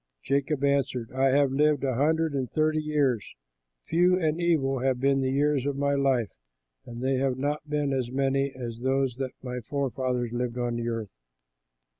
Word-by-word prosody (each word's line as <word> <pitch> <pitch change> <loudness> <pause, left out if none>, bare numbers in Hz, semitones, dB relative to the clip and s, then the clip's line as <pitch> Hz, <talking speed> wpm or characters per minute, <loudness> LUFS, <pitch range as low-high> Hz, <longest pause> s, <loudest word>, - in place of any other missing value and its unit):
Jacob 140 +3 0
answered, 135 -4 0
"I 130 +1 +1
have 140 0 +3
lived 150 +1 +2
a 135 -1 +1
hundred 160 +4 +1
and 130 -3 -2
thirty 155 0 +1
years; 145 -8 0 0.5
few 180 +2 +3
and 160 -1 0
evil 140 -6 +1
have 130 0 0
been 135 +1 +2
the 130 - 0
years 140 0 +1
of 140 - -1
my 140 0 +1
life, 135 -6 +1 0.6
and 120 +1 -7
they 135 0 +1
have 130 -1 0
not 145 +2 -2
been 145 -2 0
as 130 -3 -1
many 135 +1 0
as 120 -3 -6
those 130 -1 0
that 130 -1 -4
my 125 -1 -4
forefathers 130 -2 -2
lived 120 0 -2
on 120 -1 -1
earth." 115 -3 -3
135 Hz, 175 wpm, -27 LUFS, 125-145 Hz, 0.6 s, have